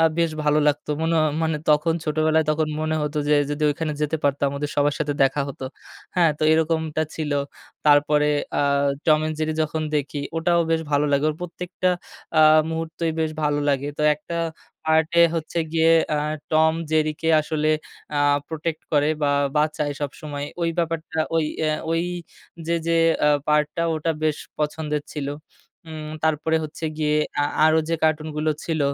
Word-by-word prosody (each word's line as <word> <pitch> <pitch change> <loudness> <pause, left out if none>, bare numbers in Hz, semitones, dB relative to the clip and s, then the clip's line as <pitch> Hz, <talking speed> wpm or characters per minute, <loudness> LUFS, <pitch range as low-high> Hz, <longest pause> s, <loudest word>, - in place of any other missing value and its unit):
আ - - +5 0.2
বেশ 170 -1 +2
ভালো 150 0 +3
লাগতো। 145 +1 0
মনও 165 0 +1 0.2
মানে 160 -1 0
তখন 155 +2 +3
ছোটোবেলায় 155 +1 +2
তখন 155 0 0
মনে 155 0 0
হত 150 +1 -3
যে, 150 - +5 0.2
যদি 145 +1 -3
ওইখানে 155 +1 -2
যেতে 150 +2 0
পারতাম 140 0 +2
ওদের 145 +1 -3
সবার 145 0 +2
সাথে 150 -1 -1
দেখা 135 +2 +2
হতো। 135 -1 -7 0.5
হ্যাঁ? 170 -3 +5
তো - - -4
এরকমটা 160 -1 +1
ছিল। 155 -2 -3 0.5
তারপরে 150 0 +4 0.3
আ - - +2 0.4
Tom 155 -1 +5
and 155 - -2
Jerry 155 0 0
যখন 155 +1 -2
দেখি 145 0 -3 0.2
ওটাও 170 +1 +2
বেশ 165 0 +2
ভালো 145 +1 +3
লাগে। 140 +1 +2
ওর - - -5
প্রত্যেকটা 180 +1 -2 0.5
আ - - +8 0.3
মুহূর্তেই 165 0 -2
বেশ 160 -1 0
ভালো 145 -1 +1
লাগে। 140 0 0
তো - - 0
একটা 160 +3 -7 0.5
পার্টে 160 +2 +3
হচ্ছে 165 +1 -3
গিয়ে 165 0 +4 0.2
আ - - +1 0.4
টম 160 0 +4 0.2
জেরিকে 155 0 0
আসলে 155 0 -1 0.5
আ - - +2 0.3
প্রটেক্ট 160 0 -4
করে 145 0 +3
বা 145 - +3 0.3
বাঁচায় 150 -1 +1
সবসময়। 145 0 -5 0.2
ওই 170 - +2
ব্যাপারটা 165 -1 -2 0.2
ওই 160 - +2 0.2
আ 155 - +2 0.2
ওই 165 0 +1 0.6
যে, 170 - +1
যে, 170 - +2 0.3
আ - - +6 0.2
পার্ট 150 0 +3
টা 170 - 0
ওটা 160 +1 -1
বেশ 155 -1 +1 0.2
পছন্দের 150 0 -2
ছিল। 145 -2 -4 0.6
উম 155 -1 -7
তারপরে 160 +1 +1
হচ্ছে 155 +1 -7
গিয়ে 150 -1 +1 0.2
আ - - +3 0.2
আরো 160 0 +5
যে, 165 - +1
কার্টুনগুলো 155 0 0
ছিল 160 -2 -2
155 Hz, 170 wpm, -23 LUFS, 150-160 Hz, 0.6 s, আ